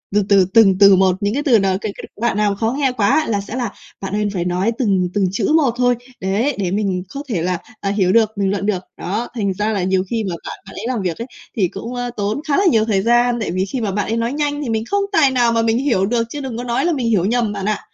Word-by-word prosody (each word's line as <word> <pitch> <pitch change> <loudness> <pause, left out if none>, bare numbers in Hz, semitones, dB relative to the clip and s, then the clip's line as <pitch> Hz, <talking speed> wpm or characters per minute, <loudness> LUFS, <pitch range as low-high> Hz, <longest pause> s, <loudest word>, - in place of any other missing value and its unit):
từ 210 - +4
từ, 195 -2 +5
từng 195 -5 +6
từ 200 -1 +8
một, 185 -1 +3
những 205 +1 0
cái 290 +3 -1
từ 240 -7 +4
nào 190 -1 +1
cái 215 - -3
cái - - -9 0.2
đoạn 235 -4 +1
nào 205 -1 +1
khó 225 +3 0
nghe 270 -3 +2
quá 250 +6 +2
là 205 -3 0
sẽ 205 +4 -7
là 240 -5 -2 0.3
"Bạn 195 0 -5
ơi, 210 0 0
phải 175 -3 -2
nói 180 +5 0
từng 190 -7 +1
từng 205 -2 +2
chữ 200 - 0
một 280 -7 +3
thôi, 245 0 +3 0.3
đấy, 215 +9 0
để 180 -2 -1
mình 195 -3 -1
có 280 - -5
thể 190 -8 -1
là, 180 +1 0 0.2
à, 200 - -1
hiểu 195 -2 +2
được, 220 -1 +2
bình 195 -1 +1
luận 200 0 -2
được." 190 -4 -1
Đó, 210 +7 -3
thành 200 -5 -1
ra 210 +3 -1
là 195 -3 -1
nhiều 185 0 +1
khi 225 -2 -1
mà 175 - -3
bạn - - -7
bạn - - -12
ấy 210 - -6
làm 250 -4 -1
việc 180 -3 -2
ấy, 235 +2 -6 0.3
thì 190 -4 +3
cũng, 225 +8 -7
a, 245 0 -3
tốn 210 +6 -1
khá 285 - +2
là 395 - +2
nhiều 225 -10 +4
thời 205 -4 +1
gian, 240 +2 +3
tại 215 - -2
vì 185 +2 0
khi 245 +5 -4
mà 210 - -1
bạn 200 0 -1
ấy 225 - -1
nói 230 +2 -1
nhanh 290 0 -1
thì 255 - -4
mình 220 -1 0
không 405 0 +2
tài 290 -8 +4
nào 240 -2 +2
mà 230 0 +2
mình 225 0 +1
hiểu 250 -8 +1
được 230 +3 +1
chứ 295 - -6
đừng 260 -4 -5
có 245 - -4
nói 240 +3 0
là 345 - +2
mình 255 -5 -1
hiểu 190 -5 +2
nhầm 230 0 0
bạn 200 -1 -4
ạ, 215 0 0
215 Hz, 300 wpm, -19 LUFS, 195-240 Hz, 0.3 s, từ